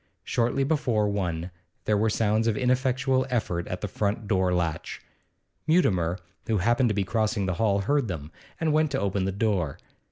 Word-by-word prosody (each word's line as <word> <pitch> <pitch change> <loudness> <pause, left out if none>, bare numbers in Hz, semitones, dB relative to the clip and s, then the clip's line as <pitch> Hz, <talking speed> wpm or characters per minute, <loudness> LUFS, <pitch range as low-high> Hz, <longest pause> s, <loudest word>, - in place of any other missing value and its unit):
Shortly 120 +3 +1
before 130 -8 +1
one 90 -3 -2 0.3
there 105 - +2
were 110 +2 +2
sounds 110 +1 +1
of 110 - +1
ineffectual 130 +1 +1
effort 90 -8 -1
at 90 - -5
the 105 - -2
front 105 +3 -2
door 95 -2 +2
latch. 85 -3 -2 0.7
Mutimer, 95 - +2 0.3
who 110 - +1
happened 120 +6 +2
to 105 - 0
be 100 - +1
crossing 110 +1 0
the 95 - 0
hall, 100 -3 +2
heard 140 +4 +1
them, 80 -5 -5 0.3
and 160 -2 +1
went 155 0 +3
to 135 -1 -1
open 100 -1 0
the 95 - 0
door. 95 -8 0
105 Hz, 180 wpm, -26 LUFS, 95-125 Hz, 0.7 s, went